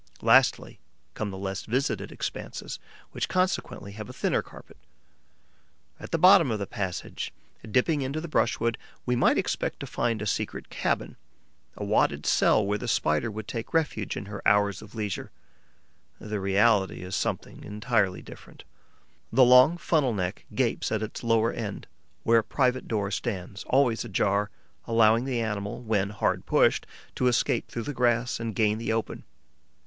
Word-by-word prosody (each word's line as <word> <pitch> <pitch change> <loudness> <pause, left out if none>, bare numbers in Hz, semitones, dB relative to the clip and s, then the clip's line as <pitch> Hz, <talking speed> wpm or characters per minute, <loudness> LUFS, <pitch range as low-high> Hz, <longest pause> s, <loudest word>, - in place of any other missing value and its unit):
Lastly - - +4 0.3
come 110 - -3
the 95 - -7
less 95 0 -4
visited 130 +5 -1
expanses, - - -5 0.3
which - - -3
consequently 185 - -1
have 105 +1 -8
a - - -8
thinner - - 0
carpet. - - -15 1.2
At - - -8
the 165 - 0
bottom 180 -3 +7
of 110 - 0
the 100 - -3
passage 95 -2 -4 0.4
dipping 140 +7 +2
into 135 +3 -2
the 170 - -6
brushwood, 115 -5 0 0.3
we 125 - +1
might 120 - +3
expect - - -1
to - - -5
find 115 -2 -1
a 105 - -4
secret 100 - -3
cabin, - - -2 0.6
a - - -4
wadded - - +1
cell 110 - +3
where 105 +1 -1
the 125 - -5
Spider 75 -3 +1
would 110 0 -7
take 115 +7 -5
refuge 145 -11 0
in 95 - -5
her 100 -1 -7
hours 100 -2 +3
of 110 +1 -13
leisure. 105 -3 -3 0.9
The 105 -1 -4
reality 100 0 +2
is 90 +1 -4
something - - -3
entirely 105 -3 0
different. - - -13 0.7
The 130 +3 +6
long 125 +7 +7
funnel 150 -8 +1
neck 90 -2 -3
gapes - - 0
at 110 0 0
its 110 - -6
lower 115 0 +2
end, 105 -4 -5 0.4
where 115 0 +5
a - - -2
private 130 +2 0
door 105 -3 -1
stands 100 -2 -4
always 125 -4 +2
ajar, 105 -1 0 0.4
allowing 115 +1 +4
the 125 -3 -1
animal, 105 -2 -3
when 105 -3 0
hard 105 -1 -1
pushed, - - +3 0.3
to 125 - +1
escape 125 -1 +1
through 115 - -4
the 145 - -4
grass 120 -1 +1
and 115 -3 -4
gain 105 0 +2
the 115 -1 -2
open. 110 0 -3
110 Hz, 165 wpm, -27 LUFS, 100-125 Hz, 1.2 s, bottom